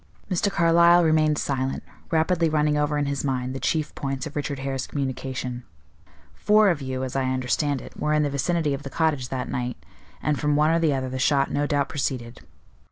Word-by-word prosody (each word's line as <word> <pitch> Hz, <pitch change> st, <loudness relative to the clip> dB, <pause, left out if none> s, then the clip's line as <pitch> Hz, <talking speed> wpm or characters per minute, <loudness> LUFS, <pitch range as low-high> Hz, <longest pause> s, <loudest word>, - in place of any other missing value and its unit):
'" -, -, -25 dB
Mr. 185 Hz, +3 st, +1 dB
Carlyle 170 Hz, -1 st, +5 dB
remained 155 Hz, -2 st, +3 dB
silent, 135 Hz, -2 st, -2 dB, 0.3 s
rapidly 165 Hz, +1 st, +2 dB
running 150 Hz, -1 st, +2 dB
over 150 Hz, 0 st, +1 dB
in 145 Hz, -, 0 dB
his 140 Hz, 0 st, -2 dB
mind 130 Hz, -2 st, -2 dB
the 135 Hz, -, -4 dB
chief 155 Hz, +1 st, -1 dB
points 135 Hz, 0 st, -4 dB
of 155 Hz, -, -8 dB
Richard 145 Hz, -1 st, -2 dB
Hare's 135 Hz, -1 st, -3 dB
communication. 130 Hz, -2 st, -4 dB, 0.7 s
"Four 210 Hz, 0 st, +4 dB
of 155 Hz, -4 st, -3 dB
you, 130 Hz, -1 st, -3 dB
as 130 Hz, 0 st, -5 dB
I 135 Hz, -1 st, +1 dB
understand 130 Hz, +2 st, -1 dB
it, -, -, -12 dB
were 150 Hz, 0 st, +1 dB
in 150 Hz, -, +3 dB
the 145 Hz, -, 0 dB
vicinity 150 Hz, +2 st, 0 dB
of 140 Hz, -, -4 dB
the 140 Hz, -, -7 dB
cottage 145 Hz, -5 st, 0 dB
that 130 Hz, -1 st, -3 dB
night, 125 Hz, 0 st, -3 dB, 0.4 s
and 150 Hz, -2 st, -1 dB
from 150 Hz, 0 st, +1 dB
one 150 Hz, +2 st, +3 dB
or 165 Hz, -, +3 dB
the 155 Hz, -4 st, +2 dB
other 130 Hz, -1 st, -2 dB
the 130 Hz, -, -4 dB
shot 135 Hz, +1 st, +2 dB
no 145 Hz, 0 st, 0 dB
doubt 145 Hz, -2 st, +1 dB
proceeded. 125 Hz, -5 st, -4 dB
145 Hz, 210 wpm, -24 LUFS, 130-155 Hz, 0.7 s, Carlyle